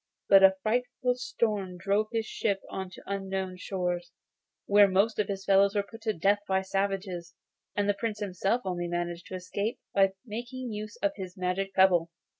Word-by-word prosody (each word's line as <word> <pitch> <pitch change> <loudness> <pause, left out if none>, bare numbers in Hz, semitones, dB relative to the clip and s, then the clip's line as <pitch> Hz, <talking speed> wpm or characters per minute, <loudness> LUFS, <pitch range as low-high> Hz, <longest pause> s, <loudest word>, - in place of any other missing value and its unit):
But 195 -1 +8
a 190 0 +7
frightful 250 +2 0
storm 210 -7 -2
drove 200 +4 +1
his 225 -1 -1
ship 200 -2 -1
on 190 -1 -4
to - - -13
unknown 190 -1 -3
shores, 180 -2 -3 0.5
where 205 0 +6
most 200 +4 +2
of 210 - +2
his 195 -1 -4
followers 195 +1 +4
were 205 - +2
put 225 +3 -13
to 220 -1 0
death 200 +4 +2
by 190 0 +2
the - - -11
savages, 190 -3 -2 0.4
and 205 -1 +1
the 205 - +4
Prince 210 +1 -3
himself 205 +3 -1
only 175 -2 -2
managed 175 0 -3
to 185 - -6
escape 200 +5 -3
by 195 -1 +4
making 240 +2 -5
use 210 0 -6
of 200 - +3
his 185 -2 -7
magic 185 +1 -2
pebble. 180 -3 +5
195 Hz, 185 wpm, -29 LUFS, 185-210 Hz, 0.5 s, But